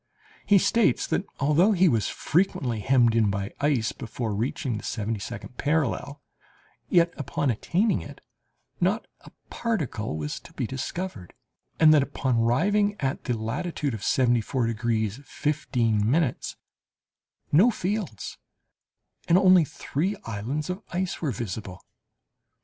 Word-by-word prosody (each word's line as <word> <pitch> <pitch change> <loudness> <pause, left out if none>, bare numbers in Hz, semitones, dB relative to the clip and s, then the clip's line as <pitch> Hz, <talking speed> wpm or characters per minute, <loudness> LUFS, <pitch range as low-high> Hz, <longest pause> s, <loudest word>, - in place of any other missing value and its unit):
He 205 - +6
states 200 +3 +3
that - - -1
although 150 +9 +4
he 185 -1 +4
was 115 - +2
frequently 140 - 0
hemmed 120 0 +3
in 110 -3 +3
by 100 0 -3
ice 140 -6 +2
before 110 -1 -4
reaching 120 +2 -2
the - - -12
seventy 110 0 -2
second 115 +3 -8
parallel, 145 -1 -1 0.7
yet, 170 0 +4
upon 145 -1 -1
attaining 185 - +1
it, - - -10 0.6
not - - +1
a - - -15 0.2
particle 135 - -2
was 75 -1 -4
to - - -16
be - - -2
discovered, 135 - -5 0.4
and 155 -1 +7
that, 150 - +6
upon 135 -3 -1
arriving 205 - +2
at 135 -1 -2
the 125 -4 0
latitude 140 +5 -2
of 105 -3 -6
74 120 0 +2
degrees 110 -1 -1
15', 125 -2 +1 1.2
no 185 +11 +6
fields, 195 - -3 0.9
and 170 - +5
only 185 -2 +6
three 175 +8 -2
islands 120 - -3
of 185 +3 -5
ice 180 +1 -2
were 155 - 0
visible. 100 -4 -5
135 Hz, 130 wpm, -26 LUFS, 115-170 Hz, 1.2 s, and